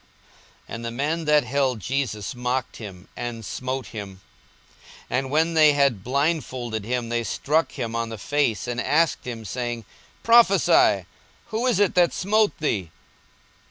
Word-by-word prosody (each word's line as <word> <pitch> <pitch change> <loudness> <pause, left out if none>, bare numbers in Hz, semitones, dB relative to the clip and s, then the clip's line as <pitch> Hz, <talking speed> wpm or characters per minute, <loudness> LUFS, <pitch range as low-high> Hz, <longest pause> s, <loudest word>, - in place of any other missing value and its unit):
42:022:063 - - -6
And 115 0 -6
the - - -2
men 150 +7 -2
that 150 0 +4
held 130 -1 0
Jesus 110 -2 -2
mocked 125 +1 -2
him, 100 -4 -10
and 120 -2 -5
smote 130 +4 -4
him. 100 -4 -8 0.9
42:022:064 125 - +2
And 135 0 -5
when 160 +4 +2
they 155 -2 +6
had 140 -9 +2
blindfolded 130 -5 -1
him, 120 0 -2
they 120 0 0
struck 150 +9 0
him 115 -4 -4
on 115 0 -2
the 115 - -6
face, 125 0 0
and 120 0 -2
asked 160 +5 +1
him, 115 -3 -6
saying, 120 +2 -4 0.4
Prophesy, 195 - +5 0.4
who 230 +3 -1
is 240 -6 +2
it 205 -2 +3
that 175 -2 +3
smote 210 +3 +1
thee? 100 - -1
125 Hz, 160 wpm, -24 LUFS, 115-155 Hz, 0.9 s, they